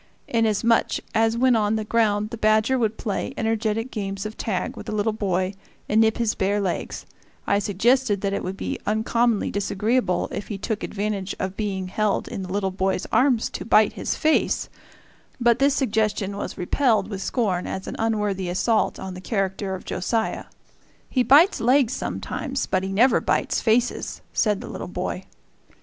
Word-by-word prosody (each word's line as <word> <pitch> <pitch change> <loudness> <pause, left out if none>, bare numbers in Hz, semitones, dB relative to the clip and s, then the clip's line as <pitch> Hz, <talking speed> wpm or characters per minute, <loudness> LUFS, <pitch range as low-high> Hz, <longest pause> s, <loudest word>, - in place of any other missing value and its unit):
Inasmuch 225 0 +2 0.2
as 225 +1 +2
when 255 0 +4
on 215 -1 +2
the 220 - -1
ground 210 -1 +1
the 235 - -5
badger 215 +3 +3
would 220 -2 0
play 205 -4 -3
energetic 225 +2 -1
games 195 -2 -4
of 215 +1 -5
tag 190 -5 -2
with - - -9
the - - -3
little 215 +1 0
boy 190 -3 -1 0.3
and 215 +2 +3
nip 220 0 +3
his 230 -2 +1
bare 200 +2 0
legs, 190 -3 -3 0.4
I 200 - +2
suggested 210 +2 +2
that 200 -1 -1
it - - -2
would 190 +1 -4
be - - -4
uncommonly 225 +1 +1
disagreeable 200 -1 0
if - - -5
he 205 - -4
took 215 +2 -3
advantage 205 -2 -3
of 190 0 -3
being 195 -3 -2
held 210 +1 0
in - - -5
the 185 -1 -6
little 195 -1 0
boy's 190 0 -1
arms 245 0 +3
to - - -5
bite - - +4
his - - -2
face; 315 0 +1 0.7
but 235 -1 +3
this 280 0 +3
suggestion 215 -5 0
was 200 - -5
repelled 215 +1 +1
with 200 -3 -5
scorn 195 -8 -1
as 190 - -4
an - - -5
unworthy 210 -4 0
assault 215 +5 +1
on 190 -1 -6
the 180 - -8
character 195 -1 -2
of 185 - -10
Josiah. 220 +5 -1 0.7
"He 255 - +2
bites 295 - +5
legs 255 0 +3
sometimes, 275 0 -3
but 185 - 0
he 190 0 -4
never 240 +7 +4
bites - - 0
faces," 235 +2 0
said 210 -3 +1
the - - -7
little - - -6
boy. - - -4
215 Hz, 175 wpm, -24 LUFS, 195-230 Hz, 0.7 s, bites